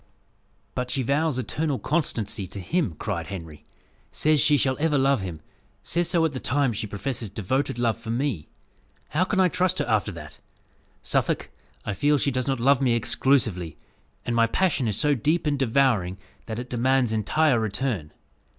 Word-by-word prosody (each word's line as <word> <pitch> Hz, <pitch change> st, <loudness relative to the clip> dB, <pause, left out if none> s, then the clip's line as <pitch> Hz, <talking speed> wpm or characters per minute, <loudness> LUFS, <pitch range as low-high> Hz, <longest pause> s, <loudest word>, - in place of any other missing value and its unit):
"But 125 Hz, 0 st, -3 dB
she 130 Hz, +1 st, 0 dB
vows 145 Hz, +2 st, +1 dB
eternal 140 Hz, +4 st, -1 dB
constancy 115 Hz, -, -1 dB
to 100 Hz, -, -8 dB
him!" 115 Hz, -, -1 dB
cried 90 Hz, -6 st, -3 dB
Henry; 80 Hz, -6 st, -8 dB, 0.5 s
"says 155 Hz, -2 st, +2 dB
she 150 Hz, -1 st, +4 dB
shall 130 Hz, 0 st, +1 dB
ever 155 Hz, -1 st, +2 dB
love 135 Hz, -3 st, +3 dB
him 85 Hz, -4 st, -6 dB, 0.4 s
says 170 Hz, 0 st, -1 dB
so 170 Hz, -3 st, +3 dB
at 160 Hz, -, 0 dB
the 130 Hz, -, -5 dB
time 135 Hz, -1 st, +1 dB
she 110 Hz, +1 st, -3 dB
professes 110 Hz, +2 st, -4 dB
devoted 115 Hz, +7 st, -1 dB
love 115 Hz, -2 st, 0 dB
for 115 Hz, -1 st, -9 dB
me! 120 Hz, -, -1 dB, 0.6 s
How 175 Hz, +5 st, +1 dB
can 195 Hz, 0 st, 0 dB
I 185 Hz, -, +6 dB
trust 180 Hz, +1 st, +1 dB
her -, -, 0 dB
after 110 Hz, -3 st, +1 dB
that? 75 Hz, -3 st, -10 dB, 0.6 s
Suffolk, -, -, 0 dB, 0.3 s
I -, -, -2 dB
feel 145 Hz, +7 st, +2 dB
she 140 Hz, -, 0 dB
does 130 Hz, -1 st, -1 dB
not 135 Hz, -2 st, 0 dB
love 135 Hz, +2 st, +4 dB
me 125 Hz, -3 st, +3 dB
exclusively; 110 Hz, -, +1 dB, 0.5 s
and 120 Hz, -, -1 dB
my 115 Hz, -1 st, +4 dB
passion 150 Hz, -2 st, +1 dB
is 105 Hz, -, -1 dB
so 150 Hz, 0 st, +3 dB
deep 155 Hz, +7 st, +1 dB
and 145 Hz, -2 st, 0 dB
devouring, 115 Hz, -8 st, +2 dB, 0.3 s
that 110 Hz, -1 st, -4 dB
it 125 Hz, +1 st, -5 dB
demands 125 Hz, -1 st, +2 dB
entire 120 Hz, +5 st, +2 dB
return. 110 Hz, -, -2 dB
125 Hz, 180 wpm, -25 LUFS, 105-145 Hz, 0.6 s, I